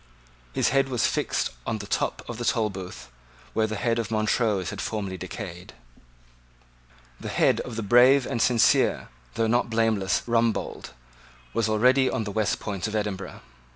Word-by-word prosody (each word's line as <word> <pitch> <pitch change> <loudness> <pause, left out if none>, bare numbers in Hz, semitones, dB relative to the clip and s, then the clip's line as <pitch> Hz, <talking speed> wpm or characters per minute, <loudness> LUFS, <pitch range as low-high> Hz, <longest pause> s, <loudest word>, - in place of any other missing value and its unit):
His - - +2
head 135 0 +2
was 125 -4 +1
fixed - - 0 0.2
on 110 - -1
the 105 - -7
top - - -2
of 120 -1 -6
the - - -3
Tolbooth, 105 - -2 0.4
where 110 -1 +1
the 110 - -4
head 115 +2 0
of 115 - -3
Montrose 110 -3 0
had 105 - -5
formerly 100 -4 -3
decayed. 90 -1 -8 1.5
The - - -6
head - - +2
of 120 - -6
the 115 - -3
brave 125 +5 +5
and 120 -4 -2
sincere, 120 -2 +3 0.3
though 115 - +1
not 120 +2 +1
blameless 110 -4 +1
Rumbold, 115 - -1 0.6
was 115 -1 0
already 125 +5 +4
on 110 - -1
the 105 - -5
West 110 0 0
Port 100 0 -3
of 110 - -4
Edinburgh. 100 -3 -4
110 Hz, 160 wpm, -25 LUFS, 100-120 Hz, 1.5 s, brave